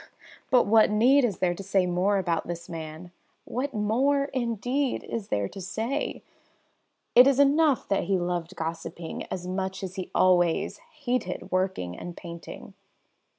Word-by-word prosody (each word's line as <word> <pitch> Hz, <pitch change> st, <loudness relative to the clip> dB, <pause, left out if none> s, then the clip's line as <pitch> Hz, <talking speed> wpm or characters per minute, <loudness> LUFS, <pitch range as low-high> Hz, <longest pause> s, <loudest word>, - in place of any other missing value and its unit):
But 250 Hz, -2 st, +5 dB
what 220 Hz, +1 st, +5 dB
need 250 Hz, +7 st, +4 dB
is 215 Hz, -7 st, 0 dB
there 180 Hz, -1 st, +1 dB
to 175 Hz, -, -8 dB
say 195 Hz, -1 st, +1 dB
more 180 Hz, +3 st, +1 dB
about 175 Hz, -3 st, -1 dB
this 170 Hz, 0 st, -6 dB
man? 160 Hz, +1 st, -8 dB, 0.3 s
What 270 Hz, +4 st, -3 dB
more, 270 Hz, +6 st, +1 dB
indeed, 250 Hz, +2 st, -1 dB
is 220 Hz, -4 st, -5 dB
there 100 Hz, -1 st, 0 dB
to 195 Hz, -, -9 dB
say? 225 Hz, +9 st, -3 dB, 0.9 s
It 250 Hz, +2 st, +8 dB
is 275 Hz, -1 st, +3 dB
enough 285 Hz, -1 st, +4 dB
that 195 Hz, -, +1 dB
he 195 Hz, -1 st, +1 dB
loved 175 Hz, 0 st, -3 dB
gossiping 165 Hz, 0 st, -5 dB
as 180 Hz, -, -4 dB
much 190 Hz, +1 st, -3 dB
as 185 Hz, +1 st, -6 dB
he 185 Hz, -, -4 dB
always 175 Hz, -2 st, +3 dB, 0.3 s
hated 240 Hz, -7 st, -2 dB
working 185 Hz, -, -1 dB
and 175 Hz, -, -8 dB
painting. 170 Hz, -2 st, -9 dB
195 Hz, 150 wpm, -27 LUFS, 175-245 Hz, 0.9 s, It